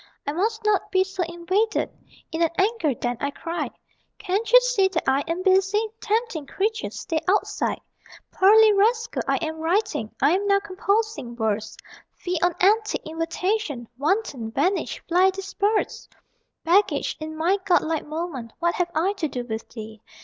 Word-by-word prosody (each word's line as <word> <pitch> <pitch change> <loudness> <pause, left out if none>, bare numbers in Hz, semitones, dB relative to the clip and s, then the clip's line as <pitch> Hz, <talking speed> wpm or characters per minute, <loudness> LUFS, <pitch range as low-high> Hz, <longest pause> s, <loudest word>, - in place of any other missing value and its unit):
"I 285 - -1
must 430 +7 -1
not 425 -2 +2
be 375 0 +4
so 385 0 -5
invaded," 375 +6 0 0.4
(In 320 - -3
an 335 - +4
anger 385 - +1
then 245 -1 -2
I 280 - -1
cried) 330 +4 -4 0.5
"Can't 425 +2 -2
you - - +10
see - - +2
that 375 -3 -3
I 270 +2 +3
am 335 +3 -2
busy? 390 +3 +3
Tempting 435 - -1
creature, 440 +7 -1
stay 320 - -3
outside! 405 +3 0 0.5
"Pearly 430 +3 +6
rascal, 450 +3 +1
I - - +2
am 315 0 -5
writing: 345 - 0
I 280 +3 +4
am 400 +2 0
now 395 0 +4
composing 400 - -1
verse 220 -2 -2 0.4
Fie 355 -2 -3
on 355 -1 +2
antic 425 +3 +2
invitation: 330 - -2
Wanton, 285 - -1
vanish 345 - 0
fly 360 +2 +4
disperse! 395 +2 -2 0.5
"Baggage, 375 +5 +2
in 315 0 -6
my 360 +5 +2
godlike 325 -5 +1
moment 300 -7 -5
What 345 0 +1
have 355 -1 -1
I 355 +6 +2
to 330 -5 -1
do 250 -3 -5
with 220 -2 -5
thee?" 220 -2 -9
365 Hz, 155 wpm, -24 LUFS, 315-415 Hz, 0.5 s, you